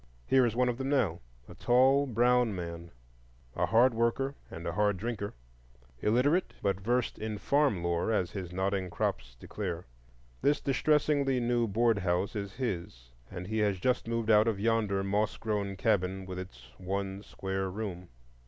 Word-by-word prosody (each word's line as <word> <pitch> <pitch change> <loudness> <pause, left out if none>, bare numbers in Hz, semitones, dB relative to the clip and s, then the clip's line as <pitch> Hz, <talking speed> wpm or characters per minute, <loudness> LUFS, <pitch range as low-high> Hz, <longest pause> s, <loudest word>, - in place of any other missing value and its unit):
Here 130 -2 +4
is 115 - -3
one 125 +1 +2
of 120 0 -1
them 135 0 -2
now,—a 80 - -2
tall 135 +3 +4
brown 120 -2 +3
man, 85 -1 -6 0.7
a - - +1
hard 120 +2 +5
worker 115 +4 0 0.2
and 85 +1 -8
a 85 - -1
hard 105 +2 +1
drinker, 105 - -4 0.6
illiterate, 130 - +2
but 100 -1 +1
versed 120 +4 0
in 110 -1 -3
farmlore, 100 - +1
as 90 -5 0
his 95 -4 -6
nodding 95 0 -1
crops 60 -6 -2
declare. 90 -4 -5 0.6
This 145 +1 +3
distressingly 140 -1 +2
new 120 -1 +1
board 115 +1 +2
house 90 +2 0
is 100 -2 -4
his, 85 - -4 0.2
and 90 -2 -6
he 110 +3 -2
has 105 -2 +2
just 125 +4 0
moved 115 -1 0
out 105 +1 +5
of 110 -4 0
yonder 105 -3 +1
moss 100 +2 0
grown 105 -3 -2
cabin 95 -2 0
with 90 0 -6
its 95 +1 -10
one 95 +1 -3
square 95 -2 -4
room. 90 -3 -5
105 Hz, 160 wpm, -30 LUFS, 95-120 Hz, 0.7 s, hard